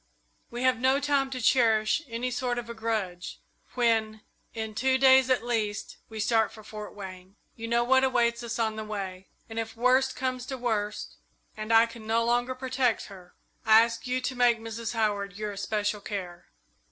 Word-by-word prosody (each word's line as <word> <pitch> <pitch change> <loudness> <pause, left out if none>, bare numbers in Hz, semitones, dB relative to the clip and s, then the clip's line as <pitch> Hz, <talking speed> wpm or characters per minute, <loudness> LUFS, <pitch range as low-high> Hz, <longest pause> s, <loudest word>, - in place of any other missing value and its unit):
We 240 +1 -5
have 255 -2 +3
no 260 +2 +3
time 280 -1 +1
to 260 -1 -5
cherish 225 0 +3
any 240 +1 -3
sort 245 0 -1
of 240 -1 -4
a 235 - -6
grudge 215 -6 -3 0.4
when, 220 -3 +1 0.3
in 220 -1 -4
two 260 +4 +2
days 265 -1 +6
at 255 -2 +2
least, 220 -3 -2
we 220 -1 -7
start 220 +1 +2
for 215 - -13
Fort 210 0 -9
Wayne. 190 -1 -10 0.2
You 230 0 -6
know 235 +1 +2
what 260 +2 +4
awaits 240 -2 +2
us 235 -1 -4
on 220 -2 -1
the 220 - -4
way, 195 -3 -6 0.2
and 225 0 -5
if 225 0 -5
worst 255 +2 +3
comes 255 -1 -3
to 265 - -4
worst, 215 -4 -3 0.4
and 215 +1 -5
I 225 0 +7
can 230 -1 -11
no 230 +1 +2
longer 245 +2 +1
protect 255 -3 -1
her, 180 -2 -15 0.3
I 220 0 +7
ask 230 +1 -4
you 255 +1 0
to 260 0 -3
make 245 -1 +4
Mrs. 225 +1 -5
Howard 205 -3 -1
your 210 +1 -4
especial 205 +1 -2
care." 180 -4 -6
230 Hz, 190 wpm, -28 LUFS, 215-250 Hz, 0.4 s, I